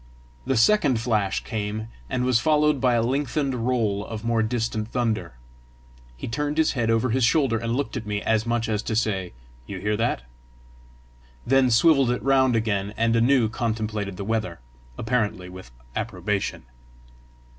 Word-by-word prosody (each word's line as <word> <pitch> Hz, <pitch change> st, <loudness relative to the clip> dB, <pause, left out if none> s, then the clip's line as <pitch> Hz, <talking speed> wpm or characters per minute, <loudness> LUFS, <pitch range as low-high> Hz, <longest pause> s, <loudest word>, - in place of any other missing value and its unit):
The 135 Hz, -2 st, +1 dB
second 135 Hz, -, +4 dB
flash 110 Hz, -4 st, 0 dB
came, 110 Hz, 0 st, -4 dB, 0.2 s
and 125 Hz, -1 st, -1 dB
was 125 Hz, -2 st, +3 dB
followed 150 Hz, 0 st, +2 dB
by 125 Hz, -2 st, +3 dB
a 115 Hz, -, +2 dB
lengthened 130 Hz, -1 st, -1 dB
roll 110 Hz, -5 st, 0 dB
of 110 Hz, +1 st, -7 dB
more 115 Hz, -1 st, +2 dB
distant 110 Hz, -1 st, -1 dB
thunder. 110 Hz, -, -2 dB, 0.8 s
He -, -, -6 dB
turned 145 Hz, +5 st, -2 dB
his 160 Hz, -, +3 dB
head 120 Hz, -4 st, -1 dB
over 115 Hz, +2 st, +2 dB
his 130 Hz, +2 st, +1 dB
shoulder 125 Hz, -2 st, +3 dB
and 115 Hz, +1 st, -2 dB
looked 140 Hz, +1 st, -2 dB
at 115 Hz, -4 st, -5 dB
me, 105 Hz, -1 st, -1 dB
as 110 Hz, 0 st, +1 dB
much 120 Hz, -1 st, 0 dB
as 105 Hz, -2 st, -1 dB
to 110 Hz, -, -3 dB
say, 100 Hz, -5 st, -1 dB, 0.3 s
"You 100 Hz, -, -6 dB
hear 105 Hz, +3 st, -1 dB
that?" 115 Hz, -, -1 dB, 1.2 s
then 135 Hz, 0 st, +4 dB
swivelled 135 Hz, +2 st, +4 dB
it 125 Hz, -, -1 dB
round 130 Hz, -2 st, +3 dB
again, 105 Hz, -2 st, -1 dB
and 115 Hz, +1 st, +2 dB
anew 120 Hz, 0 st, +4 dB
contemplated 110 Hz, -4 st, -3 dB
the 100 Hz, -, -5 dB
weather, 110 Hz, -, -2 dB, 0.4 s
apparently 110 Hz, -6 st, -1 dB
with 95 Hz, -6 st, -11 dB, 0.3 s
approbation. 105 Hz, -, -2 dB
115 Hz, 160 wpm, -24 LUFS, 105-125 Hz, 1.2 s, second